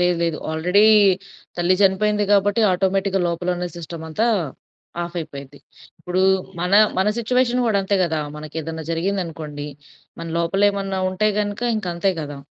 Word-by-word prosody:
లేదు, 180 -1 +2
లేదు 165 -2 -1
ఆల్రెడీ 180 +6 +3 0.7
తల్లి 175 +1 +2
చనిపోయింది. 205 +2 +2
కాబట్టి 205 +2 +3
ఆటోమేటిక్‌గా 195 +1 0
లోపలున్న 180 +1 -2
సిస్టమంతా 165 +5 -3 0.8
ఆఫయిపోయింది. 145 -5 -7 0.4
ఇప్పుడు 180 +1 -1 0.4
మన 180 +2 -1 0.3
మన 190 - +2
సిట్యుయేషన్ 250 +1 +1
గూడా 215 -3 +2
అంతే 200 +1 0
గదా! 160 -2 -1 0.2
మనకేదన్నా 160 +1 -6
జరిగిందనుకోండి, 165 -5 -3 0.5
మన 165 - -5
లోపల 170 +4 0
ఏమన్నా 195 -1 -3
ఉంటే 185 +3 +1
గనుక 205 +2 -3
ఇంక 215 - -4
అంతే 180 +3 +1
గదా! 145 -2 -6
180 Hz, 130 wpm, -21 LUFS, 165-200 Hz, 0.8 s, ఆల్రెడీ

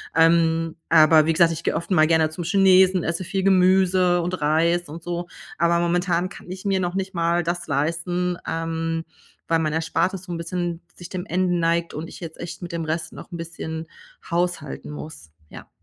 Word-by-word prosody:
ähm, 165 0 +3
aber 155 -1 +6
wie 165 - +3
gesagt, 170 0 +4
ich 165 - -7
gehe - - 0
oft 170 +3 -4
mal 155 -4 +5
gerne 160 -1 +3
zum 175 +1 -5
Chinesen, 185 0 +4
esse 170 +2 -2
viel 190 +1 -2
Gemüse 185 -1 +4
und 180 +1 -3
Reis 165 +2 +1
und 165 +2 -9
so, 175 0 -4 0.3
aber 170 0 +2
momentan 175 +1 0
kann 180 - -12
ich 190 +2 -8
mir 195 -1 +1
noch 175 0 -2
nicht 190 0 -3
mal 170 0 +1
das 175 +1 -3
leisten, 170 +4 -1
ähm, 165 0 -2 0.4
weil 165 -1 +2
mein 155 -1 -1
Erspartes 170 +3 -1
so 180 - -9
'n 170 - -3
bisschen 170 0 -3
sich 175 0 -10
dem 185 -1 -5
Ende 180 -2 0
neigt 170 0 0
und 155 +2 -5
ich - - -11
jetzt 165 -2 -8
echt 175 +2 -7
mit 175 - -6
dem 165 -1 -3
Rest 160 +1 -3
noch - - -11
'n 170 - -5
bisschen 160 -1 -6 0.4
haushalten 175 +1 -2
muss. 150 - -9 0.2
Ja. - - -12
170 Hz, 195 wpm, -23 LUFS, 165-180 Hz, 0.4 s, aber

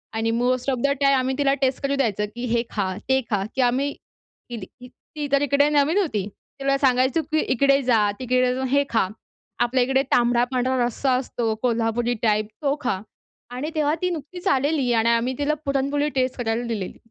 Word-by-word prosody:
आणि 225 0 0
most 250 +3 0
of 260 - -1
the - - +5
time 275 -1 +4
आम्ही 260 +1 0
तिला 275 -1 +2
टेस्ट 260 +1 +1
करू 275 0 +1
द्यायचं, 215 -7 0
की 240 - -4
हे 235 0 +2
खा, 205 -3 -1 0.2
ते 265 0 +4
खा, 200 -3 0
की 265 - +1
आम्ही 260 +4 +1
केली 230 -5 -12
ती 250 +5 -15 0.3
ती 295 -1 -3
तर 280 0 +3
इकडे 285 +1 +3
नवीन 300 +4 +2
होती. 220 - 0 0.3
तिला 275 0 +1
सांगायचो, 260 +2 +2
की 310 - +2
इकडे 275 +2 +3
जा, 245 -3 +3 0.2
तिकडे 255 0 +1
जाऊन 260 0 -2
हे 280 +2 +3
खा. 225 -4 +1 0.5
आपल्या 245 +1 +2
इकडे 265 +2 +2
तांबडा-पांढरा 245 +2 +2
रस्सा 260 +3 -1
असतो 240 -3 -2
कोल्हापुरी 235 0 +1
टाइप, 215 -1 +2
तो 280 -1 +1
खा. 190 -6 -1 0.5
आणि 255 +5 -4
तेव्हा 300 -1 +2
ती 360 - +1
नुकतीच 345 +2 -6
आलेली 275 -2 +1
आणि 225 0 +2
आम्ही 235 +2 +1
तिला 290 +1 +1
पुरणपोळी 280 +1 0
टेस्ट 255 0 0
करायला 230 0 -1
दिलेली. 210 -5 -4
255 Hz, 190 wpm, -23 LUFS, 235-280 Hz, 0.5 s, the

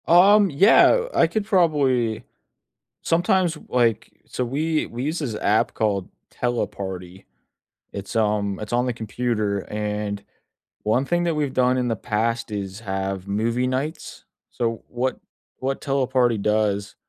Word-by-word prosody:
Um, 195 +4 +6
yeah, 205 - +5
I - - +4
could 200 +5 -2
probably 135 - +2 0.8
sometimes, 175 0 +1
like 120 -3 +1
so, 125 - -3
we 155 +6 0
we 120 +2 -6
use 155 +4 -2
this 130 -8 -3
app 105 +1 +1
called 100 -4 -1 0.2
Teleparty. 95 -6 -4 0.7
It's, 100 +2 -7
um, 105 -3 +1
it's 105 +2 -5
on 120 +1 +2
the 125 - -1
computer, 110 -2 -2
and 105 -1 -3 0.6
one 110 +5 +2
thing 175 +4 0
that 170 -1 0
we've 145 -3 -1
done 125 0 +2
in 125 -1 0
the 115 - 0
past 115 +2 -1
is 100 0 -5
have 95 -2 -3
movie 115 +5 0
nights. 135 +6 -4 0.3
So, 115 -2 -2
what 125 +2 -2 0.4
what 135 +1 -2
Teleparty 130 -4 +1
does 105 -1 0
120 Hz, 135 wpm, -23 LUFS, 105-140 Hz, 0.8 s, Um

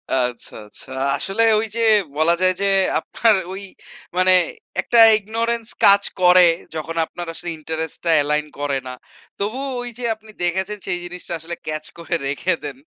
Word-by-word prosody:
আচ্ছা, 125 -2 -2
আচ্ছা। 105 - -9 0.3
আসলে 195 +4 0 0.2
ওই 220 - -1
যে 230 - -1 0.4
বলা 160 +2 +4
যায় 185 0 +4
যে - - +2 0.3
আপনার 225 -2 +2 0.2
ওই 195 +1 -7 0.5
মানে 185 0 +5 0.5
একটা 235 - +2 0.2
ইগনোরেন্স 225 +2 -2 0.2
কাজ 200 0 +7 0.2
করে 180 0 +7 0.3
যখন 160 +1 -5
আপনার 175 +1 -8
আসলে 175 - -5
ইন্টারেস্ট 160 0 -4
টা 165 - +3
এলাইন 150 +1 0
করে 145 -2 -1
না। 125 - -6 0.5
তবুও 255 +7 -3
ওই 245 - -5
যে 245 - -7
আপনি 220 0 -20
দেখেছেন 190 +4 -1
সেই 175 - -1
জিনিসটা 175 0 -7
আসলে 165 +2 -6
ক্যাচ 155 0 -4
করে 170 0 -3
রেখে 145 +6 0
দেন - - -6
180 Hz, 165 wpm, -20 LUFS, 160-215 Hz, 0.5 s, কাজ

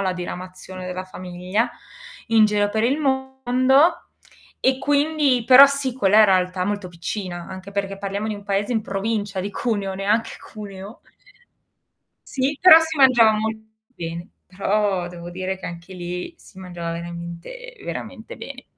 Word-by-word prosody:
La 190 -2 0
diramazione 185 +1 -7
della 185 0 -5
famiglia, 185 +4 -3 0.6
in 220 -1 +5
giro 205 -1 +1
per 220 +1 0
il 265 +5 +2
mondo. 265 +3 +2 0.6
E 260 0 +2
quindi 290 -3 +2
però 265 +2 +10
sì, 275 -2 -1
quella 215 -3 +5
è - - +8
realtà 185 -1 +2
molto 205 -2 -3
piccina, 175 0 -6
anche 190 +1 -9
perché 195 -1 -3
parliamo 200 +1 -3
di 215 - -2
un 205 - -10
paese 200 +3 -1
in 225 -2 0
provincia 205 0 -3
di 195 +2 -3
Cuneo 200 -5 -2
neanche 205 +4 0
Cuneo. 200 0 -10 1.3
Sì, 275 +2 -1
però 365 -2 +10
si 320 -1 -3
mangiava 235 -5 +6
molto 220 0 -4 0.2
bene. 170 -1 -6 0.2
Però, 195 -1 0
devo 175 0 -9
dire 185 +1 -4
che - - -6
anche 170 +2 -9
lì, 180 - -6
si 195 - -17
mangiava 175 -3 -6
veramente, 170 - -8
veramente - - -7
bene. - - -9
205 Hz, 150 wpm, -22 LUFS, 185-250 Hz, 1.3 s, però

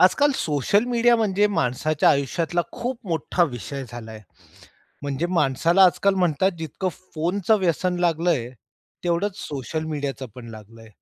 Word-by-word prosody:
आजकाल 280 +10 +5
social 160 - +1
media 240 0 +4
म्हणजे 210 -2 +2
माणसाच्या 145 +4 +2
आयुष्यातला 160 +5 0
खूप 245 0 -4
मोठ्ठा 170 +2 +1
विषय 135 +3 -6
झालाय. 110 -2 -9 0.8
म्हणजे 145 +4 -2
माणसाला 165 +8 +4
आजकाल 195 +2 +3
म्हणतात 175 +3 +2
जितकं 160 +4 -3 0.3
फोनच 175 +5 -2
व्यसन 180 -3 +2
लागलंय, 165 -7 +1 0.5
तेवढंच 180 +3 0
सोशल 145 +3 -4
मीडियाच 140 -4 -4
पण 120 -2 -10
लागलंय. 110 +1 -13
165 Hz, 125 wpm, -23 LUFS, 135-190 Hz, 0.8 s, आजकाल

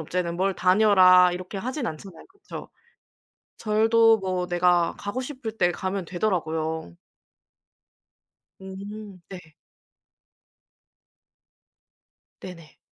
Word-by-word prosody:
없잖아요. 170 +2 -3
뭘 190 +2 0
다녀라 185 -1 +5
이렇게 185 +2 -6
하진 255 +5 -4
않잖아요. 165 0 -9
그쵸. 390 +1 -11 0.9
절도 225 +1 +3
뭐 185 -2 -3
내가 175 -1 +1
가고 205 +6 -5
싶을 255 -4 -6
때 175 -4 +2
가면 190 +1 -4
되더라고요. 160 -4 -3 1.7
음 200 +1 -9
네. 185 - -8 3.0
네네. 170 -4 -12
185 Hz, 185 characters per minute, -24 LUFS, 175-215 Hz, 3.0 s, 다녀라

